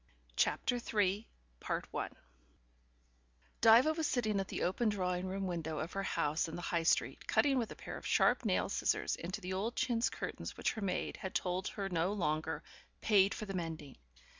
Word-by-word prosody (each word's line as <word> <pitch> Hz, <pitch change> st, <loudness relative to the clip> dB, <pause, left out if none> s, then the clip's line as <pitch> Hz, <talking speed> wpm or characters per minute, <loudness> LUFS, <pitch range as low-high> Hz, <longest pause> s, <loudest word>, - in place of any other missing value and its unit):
CHAPTER 245 Hz, -, +1 dB
THREE 210 Hz, -2 st, 0 dB, 0.3 s
Diva -, -, -2 dB, 2.1 s
was 315 Hz, -1 st, 0 dB
sitting 220 Hz, -5 st, +1 dB
at 195 Hz, -, -2 dB
the -, -, -3 dB
open 215 Hz, +5 st, +1 dB
drawing 180 Hz, -2 st, -1 dB
room 195 Hz, +1 st, -2 dB
window 165 Hz, -3 st, -3 dB
of 160 Hz, +3 st, -4 dB
her 195 Hz, -, -1 dB
house 155 Hz, -4 st, 0 dB
in 160 Hz, -, -6 dB
the 175 Hz, -, -5 dB
High 170 Hz, -, 0 dB
Street, 165 Hz, -, +1 dB
cutting 275 Hz, -3 st, +3 dB
with 230 Hz, -, -2 dB
a -, -, -7 dB
pair -, -, -7 dB
of -, -, -7 dB
sharp -, -, +4 dB
nail -, -, +1 dB
scissors -, -, 0 dB
into 190 Hz, +5 st, -5 dB
the 185 Hz, 0 st, -4 dB
old 215 Hz, +6 st, -2 dB
chintz 235 Hz, -2 st, +1 dB
curtains -, -, -5 dB
which -, -, +1 dB
her 220 Hz, -, -6 dB
maid 195 Hz, -2 st, -2 dB
had 190 Hz, -, -6 dB
told 185 Hz, +2 st, 0 dB
her 200 Hz, -2 st, -3 dB
no 180 Hz, +1 st, 0 dB
longer 155 Hz, -6 st, -1 dB, 0.4 s
"paid 200 Hz, -2 st, +4 dB
for 215 Hz, -, -5 dB
the 195 Hz, -, -5 dB
mending". 160 Hz, -6 st, -5 dB
190 Hz, 180 wpm, -34 LUFS, 175-215 Hz, 2.1 s, sharp